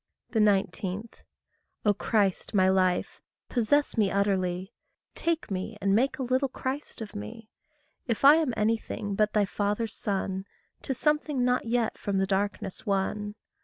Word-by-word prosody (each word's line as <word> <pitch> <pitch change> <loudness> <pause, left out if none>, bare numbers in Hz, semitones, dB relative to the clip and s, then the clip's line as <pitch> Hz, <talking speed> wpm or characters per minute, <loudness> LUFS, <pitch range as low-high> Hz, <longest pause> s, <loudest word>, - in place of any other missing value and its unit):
19. 200 -1 +1 0.8
O 205 - +5
Christ, 205 0 0
my 185 -1 +5
life, 185 -1 +1 0.3
possess 285 +5 +2
me 210 -3 +3
utterly. 190 0 0 0.4
Take 330 -8 -1
me 195 +3 -3
and 195 -1 +2
make 255 +7 +2
a 265 - -2
little 260 +2 +1
Christ 260 +1 -5
of 215 - -7
me. 105 - -8 0.6
If 230 +2 0
I 295 +3 +9
am 315 -6 +1
anything 215 -1 -1
but 210 +1 +1
thy 210 -1 +3
father's 210 +3 -1
son, 190 -1 -2 0.4
'Tis 265 - -3
something 300 -2 +1
not 250 0 +1
yet 235 -1 0
from 200 -1 -1
the 195 - +2
darkness 195 0 -2
won. 205 +1 -1
210 Hz, 145 wpm, -28 LUFS, 195-245 Hz, 0.8 s, I